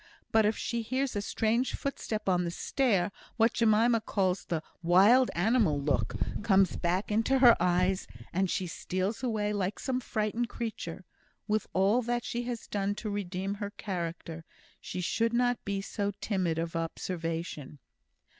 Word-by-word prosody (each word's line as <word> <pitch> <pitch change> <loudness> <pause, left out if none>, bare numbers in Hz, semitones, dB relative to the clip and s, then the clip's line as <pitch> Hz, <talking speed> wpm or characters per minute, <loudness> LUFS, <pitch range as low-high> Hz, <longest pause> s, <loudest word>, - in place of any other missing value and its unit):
But 220 -1 +4
if 215 - 0
she 235 -1 -2
hears 255 +3 -1
a 205 - 0
strange 225 +4 0
footstep 220 -6 -4
on 180 -2 +3
the 170 - -1
stair, 200 0 +1 0.3
what 225 0 +4
Jemima 230 +1 +3
calls 190 -3 0
the 160 -2 -2 0.2
'wild 200 +9 +6
animal 195 - +3
look' 140 -6 0 0.3
comes 195 -3 +3
back 180 +5 -1
into 225 +5 +2
her 245 -3 +8
eyes, 180 +2 +1 0.3
and 190 +1 +1
she 185 - -1
steals 185 +4 -3
away 215 -4 0
like 200 0 -1
some 260 -2 -1
frightened 230 0 -2
creature. 190 -6 -5 0.4
With 215 -1 0
all 200 +6 +3
that 240 0 -1
she 240 -1 -2
has 240 -2 -4
done 200 0 -1
to 215 0 -4
redeem 195 -1 -3
her 205 0 -4
character, 170 -5 -5 0.4
she 180 - -5
should 230 +6 0
not 245 0 +1
be 200 -1 -1
so 200 0 -2
timid 185 -6 0
of 165 0 -3
observation." 165 -3 -4
205 Hz, 155 wpm, -30 LUFS, 180-230 Hz, 0.4 s, her